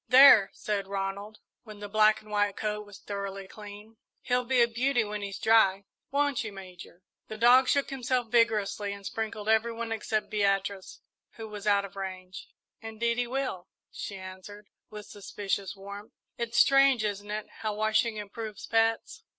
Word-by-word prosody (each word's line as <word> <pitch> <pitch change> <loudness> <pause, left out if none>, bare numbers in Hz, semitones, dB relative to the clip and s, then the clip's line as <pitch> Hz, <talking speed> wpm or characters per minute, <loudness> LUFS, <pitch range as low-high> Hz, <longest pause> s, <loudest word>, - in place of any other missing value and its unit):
"There," 255 -6 +8
said 200 -2 -3
Ronald, 200 +2 -4 0.2
when 215 -3 -12
the 205 0 -7
black 215 +1 +3
and 215 - -15
white 205 -1 +1
coat 210 -1 -3
was 205 -1 -12
thoroughly 200 -1 -6
clean, 210 +2 -12 0.3
"he'll 250 0 0
be 260 0 +2
a - - +3
beauty 240 +1 +1
when 210 0 -5
he's 200 -1 -5
dry 200 -3 +3 0.2
won't 285 -2 0
you, 215 - -6
Major?" 185 -2 -12 0.2
The 215 - -7
dog 250 +3 +6
shook 280 +1 +1
himself 250 -3 -1
vigorously 210 -3 +1
and 200 0 -11
sprinkled 220 -1 -4
every 220 +1 +3
one 230 0 -5
except 220 -1 -2
Beatrice, 195 -2 -1 0.3
who 225 -1 -8
was 210 -1 -8
out 200 -1 +3
of 200 - -12
range. 185 -1 -7 0.3
"Indeed 230 +2 -2
he 245 - 0
will," 250 -8 -3 0.2
she 200 - -6
answered, 190 +2 -11 0.2
with 210 -1 -9
suspicious 200 -1 -4
warmth. 200 +2 -10 0.2
"It's 235 0 -3
strange, 275 -4 +5
isn't 205 0 -3
it, 210 0 -3
how 215 -1 -2
washing 215 +1 +1
improves 210 +1 -7
pets?" 225 0 0
210 Hz, 165 wpm, -28 LUFS, 200-230 Hz, 0.3 s, There